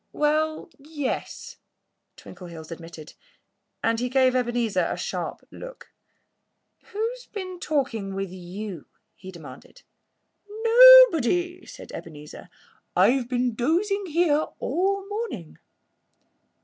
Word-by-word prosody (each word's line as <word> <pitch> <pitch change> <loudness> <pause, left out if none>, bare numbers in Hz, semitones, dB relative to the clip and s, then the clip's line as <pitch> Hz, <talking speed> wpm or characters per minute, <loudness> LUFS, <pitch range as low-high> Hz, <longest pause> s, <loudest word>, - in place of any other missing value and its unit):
"Well 310 +2 0
yes!" 290 -2 -5 0.6
Twinkleheels 170 -3 -11
admitted. 165 -2 -10 0.7
And 225 0 +1
he 250 +1 -2
gave 260 0 +3
Ebenezer 240 -3 0
a - - -3
sharp - - -5
look. - - -11 0.9
"Who's 465 +4 -5
been 370 -3 -7
talking 235 - -2
with 195 -2 -4
you?" 185 -1 -8 0.3
he 185 - -12
demanded. 145 -7 -13 0.8
"Nobody!" 450 - +7
said - - -11
Ebenezer. 150 -2 -10 0.5
"I've 250 -1 +3
been 245 -1 0
dozing 370 - 0
here 310 -2 +1
all 385 +7 -1
the - - -15
morning." 410 - -6
265 Hz, 100 wpm, -24 LUFS, -, 0.9 s, Nobody